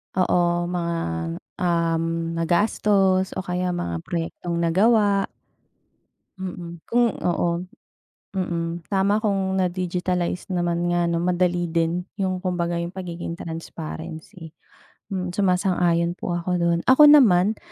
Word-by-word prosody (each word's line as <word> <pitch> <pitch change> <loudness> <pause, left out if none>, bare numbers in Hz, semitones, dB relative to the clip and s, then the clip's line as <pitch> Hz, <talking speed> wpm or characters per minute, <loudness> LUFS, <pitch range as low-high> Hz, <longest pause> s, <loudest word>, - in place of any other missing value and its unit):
Oo 175 -1 +2
mga, 170 -1 -1 0.6
um, 170 -2 +1 0.3
nagastos 190 +2 +2
o 185 - -3
kaya 180 0 -2
mga 85 - -3
proyektong 170 0 -3
nagawa. 200 +4 +3 1.2
Mm 175 -2 -6
kung 240 -1 +2
oo 175 0 -1 0.7
mm 170 -2 -2
tama 200 +2 +2
kong 195 -2 0
na-digitalize 180 0 -1
naman 175 -1 0
nga 175 0 +1
'no 170 0 0
madali 175 -1 +1
din 170 +1 0 0.2
yung 185 -1 -1
kumbaga 175 -2 -1
yung 170 0 -2
pagiging 175 -2 -6
transparency, 160 0 -7 0.6
hmm 180 -2 -3
suma-sang-ayon 180 -3 +1
po 175 -1 -3
ako 175 +2 -4
dun. 170 -1 +2
Ako 290 +3 +8
naman, 215 -7 +5
175 Hz, 110 wpm, -23 LUFS, 170-190 Hz, 1.2 s, Ako